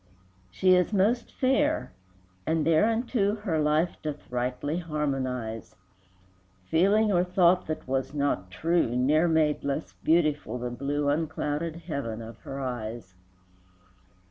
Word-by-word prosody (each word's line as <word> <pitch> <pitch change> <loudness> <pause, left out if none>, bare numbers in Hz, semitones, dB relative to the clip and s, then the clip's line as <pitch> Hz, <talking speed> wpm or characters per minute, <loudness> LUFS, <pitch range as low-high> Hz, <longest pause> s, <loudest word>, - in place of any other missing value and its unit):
VII. 90 - -35 0.5
She 185 -1 +5
is 180 +2 +3
most 215 +4 +1
fair, 285 +4 +1 0.5
and 160 -2 +1
thereunto 215 +5 +2
Her 200 -7 -2
life 155 +3 +1
doth 150 -4 -6
rightly 125 +6 -2
harmonize; 130 - -3 0.9
Feeling 200 - +3
or 175 -2 +3
thought 180 0 +3
that 155 -4 -4
was 130 0 -1
not 140 -10 -1
true 160 - 0
Ne'er 150 +7 +3
made 155 -2 +2
less 140 +2 -3
beautiful 155 -7 +1
the 125 0 -4
blue 140 +3 -2
Unclouded 155 +1 -1
heaven 140 -9 -4
of 115 -1 -9
her 135 +6 -7
eyes. 120 -6 -5
150 Hz, 125 wpm, -27 LUFS, 130-175 Hz, 0.9 s, She